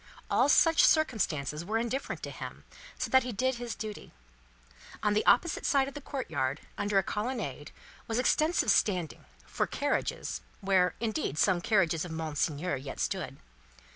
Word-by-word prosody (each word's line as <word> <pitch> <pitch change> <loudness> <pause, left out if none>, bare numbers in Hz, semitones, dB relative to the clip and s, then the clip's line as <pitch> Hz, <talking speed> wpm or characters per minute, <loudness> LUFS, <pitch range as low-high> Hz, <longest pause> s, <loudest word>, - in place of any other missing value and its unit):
All - - +4
such 325 +2 +5
circumstances 170 - +2
were 215 +5 -1
indifferent 235 +4 -3
to - - -4
him, - - -8 0.3
so - - -3
that 260 - +6
he 250 - -4
did 255 +3 0
his 240 -1 -4
duty. 215 -2 -7 0.9
On 210 -1 +3
the 210 - +2
opposite 320 +6 +4
side 275 -2 +3
of 275 - -7
the 290 - -7
courtyard, 145 - -3
under 205 0 0
a 195 - +4
colonnade, 210 - -3 0.4
was 225 - -1
extensive 310 +6 +3
standing 180 -7 +1 0.2
for - - -1
carriages - - -2 0.2
where, 190 -2 +2
indeed, 220 - -2
some 180 0 +3
carriages 175 -7 +2
of 180 - -6
Monseigneur 155 0 -2
yet 135 +1 -8
stood. - - -2
210 Hz, 155 wpm, -30 LUFS, 160-255 Hz, 0.9 s, that